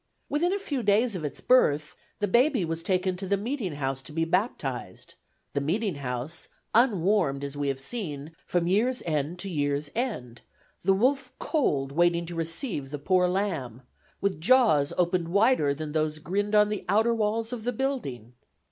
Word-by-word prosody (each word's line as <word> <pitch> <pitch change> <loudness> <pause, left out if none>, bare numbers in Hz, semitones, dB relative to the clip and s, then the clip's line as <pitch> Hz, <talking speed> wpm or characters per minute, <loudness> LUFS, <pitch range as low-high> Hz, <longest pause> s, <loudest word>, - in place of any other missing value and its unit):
Within 335 +5 +1
a 400 - +1
few 295 -10 -3
days 215 +1 +2
of 170 - -4
its 145 -2 -5
birth, 150 - +3 0.2
the 205 - 0
baby 240 - +3
was 165 0 -3
taken 185 +1 0
to 190 +1 -5
the 200 +1 +2
meeting 220 - -3
house 135 -2 -2
to 150 - -8
be 165 +2 0
baptized; 150 - -2 0.4
the 140 - 0
meeting 190 +7 0
house, 135 +3 -4 0.3
unwarmed, 195 - +3
as 140 0 -5
we 145 0 -2
have 135 -1 -1
seen, 150 - -5
from 175 -1 0
year's 225 +8 +1
end 155 +1 -1
to 195 - -4
year's 145 -3 -1
end, 125 - -3 0.4
the 190 +2 +4
wolf 265 +7 +1
Cold 200 - 0
waiting 170 +2 +2
to 175 - -7
receive 165 - -3
the 145 - -4
poor 180 +5 +2
lamb, 165 - -2 0.4
with 195 -5 -1
jaws 215 - +4
opened 175 -1 +1
wider 200 - +3
than 150 +1 -4
those 155 0 0
that 155 - -13
grinned 205 +4 0
on 210 0 +5
the 210 -1 -3
outer 220 +4 +3
walls 225 +1 -1
of 230 -3 -5
the 245 - 0
building. 215 - -3
180 Hz, 180 wpm, -27 LUFS, 145-220 Hz, 0.4 s, on